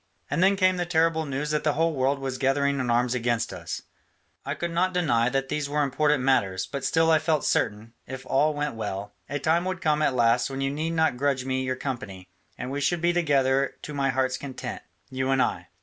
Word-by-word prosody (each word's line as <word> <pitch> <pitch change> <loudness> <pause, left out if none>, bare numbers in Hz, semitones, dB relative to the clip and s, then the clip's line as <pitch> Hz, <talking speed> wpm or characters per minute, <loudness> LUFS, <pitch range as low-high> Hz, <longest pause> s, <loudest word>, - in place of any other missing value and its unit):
And - - +1
then 195 +2 +5
came 185 -1 +3
the 175 - -1
terrible 160 -2 +2
news 140 +2 -2
that 150 - 0
the 150 - +2
whole 165 +1 +1
world 135 0 +1
was 135 -1 -4
gathering 140 +1 +1
in 125 -1 -1
arms 120 +1 +2
against 120 -1 -1
us; - - -6 0.6
I 140 +2 -3
could 170 +3 -3
not 180 +2 0
deny 120 -9 +2
that 135 +1 -1
these 150 -1 -2
were 150 0 +1
important 145 0 +1
matters, 95 -8 +1
but 140 -2 -6
still 160 0 +3
I 160 - +5
felt 155 -1 0
certain, 105 +3 0
if 130 0 -7
all 150 +3 +2
went 145 -1 -2
well, 105 -2 -5 0.2
a 145 - -2
time 160 +4 +1
would 185 0 -2
come 155 -4 +1
at 140 -4 +2
last 120 +1 +3
when 135 0 -5
you 135 0 0
need 160 +3 -2
not 160 -6 +2
grudge 135 -1 0
me 130 0 -1
your 130 0 -1
company, 110 -9 -6 0.3
and 125 +1 -5
we 140 +1 -3
should 170 +5 +1
be 170 +1 +2
together 140 -5 +2
to 150 - -6
my 140 -1 0
heart's 130 0 0
content, 135 -1 -6 0.3
you 130 0 -2
and 135 0 +2
I. - - 0
140 Hz, 230 wpm, -26 LUFS, 130-155 Hz, 0.6 s, then